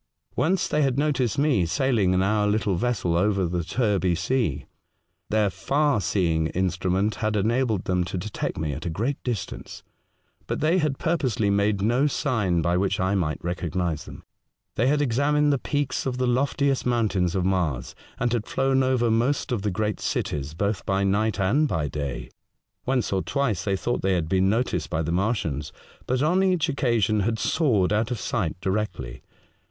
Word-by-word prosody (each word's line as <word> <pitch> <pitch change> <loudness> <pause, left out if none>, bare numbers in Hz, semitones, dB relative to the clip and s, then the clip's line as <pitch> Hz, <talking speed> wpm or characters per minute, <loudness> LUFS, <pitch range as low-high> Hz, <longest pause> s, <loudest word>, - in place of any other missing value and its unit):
Once 185 +3 +1
they 150 - +1
had 135 -3 +1
noticed 140 -4 +1
me 140 - +3
sailing 100 +2 +1
in 95 0 +2
our 105 +1 +2
little 105 -2 +1
vessel 90 -4 0
over 95 +1 +2
the 85 0 -2
Terby 95 -3 +1
Sea. 90 - -1 0.6
Their 105 -2 +2
far 140 - +1
seeing 80 -3 +1
instrument 95 +3 0
had 110 -1 0
enabled 110 0 +1
them 90 -1 +1
to 90 +1 -4
detect 100 +4 -4
me 75 -2 -2
at 75 +5 -5
a - - -1
great 115 - -2
distance, 120 -7 -5 0.6
but - - -2
they 165 +5 +2
had 150 -4 0
purposely 125 -11 0
made 100 0 +1
no 120 +7 +3
sign 110 - 0
by 85 +2 +1
which 95 +1 0
I 95 +1 +1
might 85 -6 -1
recognise 85 -2 -2
them. - - -11 0.5
They 120 - +1
had 145 +1 +2
examined 145 +3 +2
the 140 - 0
peaks 145 -2 -2
of 125 -1 -2
the 130 - 0
loftiest 135 +2 +1
moun 120 -3 +1
tains 90 -3 0
of 90 -2 0
Mars, 85 -10 -1 0.3
and 120 0 0
had 115 -2 -1
flown 135 0 +1
over 130 -3 +2
most 125 +5 +1
of 120 -5 0
the 105 - -1
great 105 +2 -2
cities 75 +1 -3
both 100 +2 -1
by 95 0 0
night 100 +2 +1
and 125 +11 +2
by 80 - -1
day. 70 -3 -5 0.6
Once 125 -6 0
or 95 - +1
twice 115 -11 -1
they 100 - +1
thought 120 +5 -2
they 95 0 +1
had 85 -3 -1
been 95 +2 +2
noticed 100 -6 0
by 80 -1 -1
the 80 - -2
Martians, 90 - -1 0.4
but 130 +2 +1
on 175 +5 +3
each 180 -4 +2
occasion 115 -7 +1
had 110 +3 0
soared 110 - +1
out 110 +1 +1
of 125 - -3
sight 90 -8 -2
directly. 90 - -3
105 Hz, 180 wpm, -25 LUFS, 90-130 Hz, 0.6 s, me